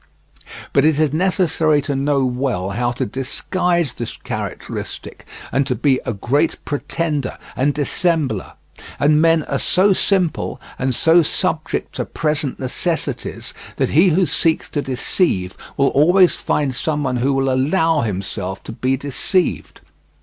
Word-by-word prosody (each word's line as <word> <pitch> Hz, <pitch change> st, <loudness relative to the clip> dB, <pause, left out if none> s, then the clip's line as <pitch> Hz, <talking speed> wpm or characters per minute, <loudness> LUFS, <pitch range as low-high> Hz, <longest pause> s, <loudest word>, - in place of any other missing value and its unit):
But 140 Hz, -, +4 dB
it 155 Hz, -1 st, +3 dB
is 155 Hz, -2 st, +2 dB
necessary 165 Hz, -3 st, +2 dB
to 140 Hz, 0 st, -2 dB
know 140 Hz, 0 st, +1 dB
well 125 Hz, -7 st, -1 dB
how 120 Hz, +4 st, 0 dB
to 120 Hz, -, -2 dB
disguise 170 Hz, -, -1 dB
this -, -, -6 dB
characteristic, -, -, -6 dB, 0.2 s
and 135 Hz, 0 st, +1 dB
to 125 Hz, -, 0 dB
be 135 Hz, -1 st, +2 dB
a -, -, +1 dB
great 140 Hz, +9 st, 0 dB
pretender 145 Hz, -1 st, -2 dB, 0.2 s
and 140 Hz, +3 st, +2 dB
dissembler; 145 Hz, -, -1 dB, 0.5 s
and 150 Hz, +1 st, +4 dB
men 165 Hz, -1 st, +4 dB
are -, -, -2 dB
so 195 Hz, +2 st, +3 dB
simple, 185 Hz, -3 st, 0 dB, 0.2 s
and 130 Hz, -1 st, 0 dB
so 165 Hz, +6 st, +5 dB
subject 165 Hz, 0 st, -1 dB
to -, -, -1 dB
present 150 Hz, -3 st, -2 dB
necessities, 155 Hz, +6 st, -2 dB, 0.2 s
that -, -, 0 dB
he 170 Hz, +6 st, +5 dB
who 180 Hz, +3 st, +3 dB
seeks 160 Hz, +2 st, +1 dB
to 145 Hz, -, -1 dB
deceive 125 Hz, -, 0 dB, 0.2 s
will 135 Hz, 0 st, +3 dB
always 175 Hz, +5 st, +5 dB
find 140 Hz, -3 st, -1 dB
someone 140 Hz, -1 st, -1 dB
who 135 Hz, +3 st, +1 dB
will 135 Hz, 0 st, +1 dB
allow 160 Hz, +4 st, +2 dB
himself 95 Hz, -2 st, -4 dB
to -, -, -7 dB
be 130 Hz, +3 st, 0 dB
deceived. 150 Hz, +7 st, -1 dB
145 Hz, 140 wpm, -19 LUFS, 130-165 Hz, 0.5 s, so